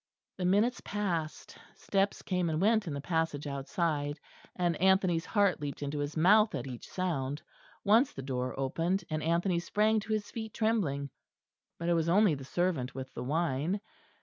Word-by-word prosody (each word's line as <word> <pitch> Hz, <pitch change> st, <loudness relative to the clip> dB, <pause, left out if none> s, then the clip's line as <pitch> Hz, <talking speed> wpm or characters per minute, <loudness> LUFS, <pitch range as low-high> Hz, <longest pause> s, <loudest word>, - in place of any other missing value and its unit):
The 180 Hz, -, -2 dB
minutes 210 Hz, +7 st, +2 dB
passed; 175 Hz, -7 st, -3 dB, 0.2 s
steps 195 Hz, 0 st, 0 dB
came 180 Hz, -3 st, 0 dB
and 155 Hz, -1 st, -1 dB
went 215 Hz, +1 st, +3 dB
in 155 Hz, -, -2 dB
the 140 Hz, -, -4 dB
passage 160 Hz, -2 st, -1 dB
outside; 145 Hz, +1 st, -2 dB, 0.4 s
and 175 Hz, -2 st, +1 dB
Anthony's 185 Hz, -3 st, +3 dB
heart 200 Hz, -7 st, +2 dB
leaped 145 Hz, 0 st, -4 dB
into 145 Hz, +1 st, -3 dB
his 145 Hz, +2 st, -3 dB
mouth 210 Hz, +6 st, +5 dB
at -, -, -3 dB
each 125 Hz, -3 st, -8 dB
sound. 150 Hz, -6 st, -2 dB, 0.4 s
Once 225 Hz, +7 st, +4 dB
the 135 Hz, -, -7 dB
door 130 Hz, 0 st, -3 dB
opened, 165 Hz, +8 st, 0 dB
and 155 Hz, 0 st, -1 dB
Anthony 170 Hz, +2 st, +1 dB
sprang 215 Hz, +5 st, +2 dB
to 215 Hz, +1 st, -3 dB
his 215 Hz, -1 st, -2 dB
feet 220 Hz, -2 st, -6 dB
trembling. 160 Hz, -, 0 dB, 0.7 s
But 170 Hz, -, -4 dB
it -, -, +4 dB
was 165 Hz, -1 st, +1 dB
only 200 Hz, 0 st, +5 dB
the 135 Hz, -2 st, -5 dB
servant 155 Hz, -3 st, -1 dB
with 130 Hz, 0 st, -7 dB
the 120 Hz, -, -5 dB
wine. 160 Hz, +5 st, 0 dB
170 Hz, 175 wpm, -31 LUFS, 145-200 Hz, 0.7 s, mouth